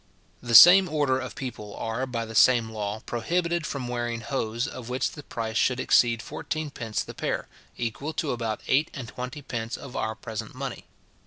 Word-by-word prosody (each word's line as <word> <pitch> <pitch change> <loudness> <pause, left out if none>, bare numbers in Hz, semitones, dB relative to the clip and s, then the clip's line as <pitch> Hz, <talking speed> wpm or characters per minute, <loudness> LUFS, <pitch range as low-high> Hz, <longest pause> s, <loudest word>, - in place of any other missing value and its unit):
The 120 -1 0
same 180 +5 +10
order 145 -4 +1
of 130 -3 -6
people 105 -6 -6
are, 115 +4 -3
by 115 -2 -3
the 115 - -9
same 115 0 +5
law, 105 0 -4
prohibited 170 +7 -1
from 135 -3 -4
wearing 120 -1 -3
hose, 115 0 -2
of 125 -4 -8
which 125 +1 -1
the 150 - -9
price 115 -4 -4
should 125 -1 +2
exceed 115 -3 +3
fourteen 155 -2 -4
pence 115 -5 -3
the - - -9
pair, - - -3 0.3
equal 120 +6 -3
to 150 -3 -1
about 115 -3 -3
eight 145 +4 +3
and 130 -4 -6
twenty 125 +5 -7
pence 115 -2 -4
of 135 - -10
our 110 0 -2
present 110 -1 -7
money. - - -6
120 Hz, 185 wpm, -26 LUFS, 115-135 Hz, 0.3 s, same